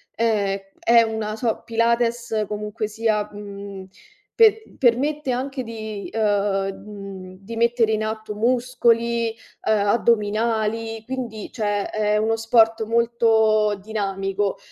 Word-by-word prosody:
ehm, 205 -4 +1 0.2
è 235 0 +5
una 220 -1 -3
so 230 -2 -1
Pilates, 230 -1 +1
comunque 210 +1 -3
sia, 215 -1 0
mhmm, 200 -2 -8 0.5
pe 445 -1 +4
permette 275 +3 +1
anche 260 +2 -3
di 220 -3 -6
uhm, 225 - -2 0.7
mhmm, 195 -3 -9
di 210 +4 -8
mettere 235 -1 +2
in 215 0 0
atto 215 -1 -4
muscoli, 235 -1 +1 0.3
uhm, 220 - +4
addominali, 225 0 +1
quindi, 240 -4 -5
cioè 205 -3 -1
è 210 0 +1
uno 220 +1 +1
sport 225 0 +3
molto 225 -2 +2
dinamico, 195 -1 -2
220 Hz, 115 wpm, -22 LUFS, 210-235 Hz, 0.7 s, è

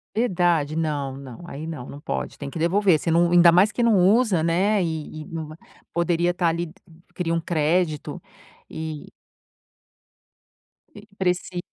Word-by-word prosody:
Verdade? 175 -9 +1
Não, 145 -4 -2
não, 135 +2 -10
aí 155 -1 -7
não, 155 -6 -6
não 140 - -9
pode! - - -4
Tem 140 - -6
que 140 - -8
devolver 180 +2 +3
você 165 - -1
não 170 +1 +3
ainda 175 -1 +7
mais 185 +5 +4
que 240 - -1
não 230 -2 +4
usa, 215 -5 +3
né, 185 +5 +2
e 160 -2 -4
e - - -9
não 165 -4 -6
vai 155 +1 -11 0.4
poderia 170 0 +1
estar 175 -1 0
ali 170 +1 0
de 160 - -12 0.4
cria 170 -3 -2
um 165 - +1
crédito 160 -1 -1 0.5
e 155 -2 -6 1.9
e 205 0 -12
preci 180 -1 -1
170 Hz, 165 wpm, -23 LUFS, 155-180 Hz, 1.9 s, ainda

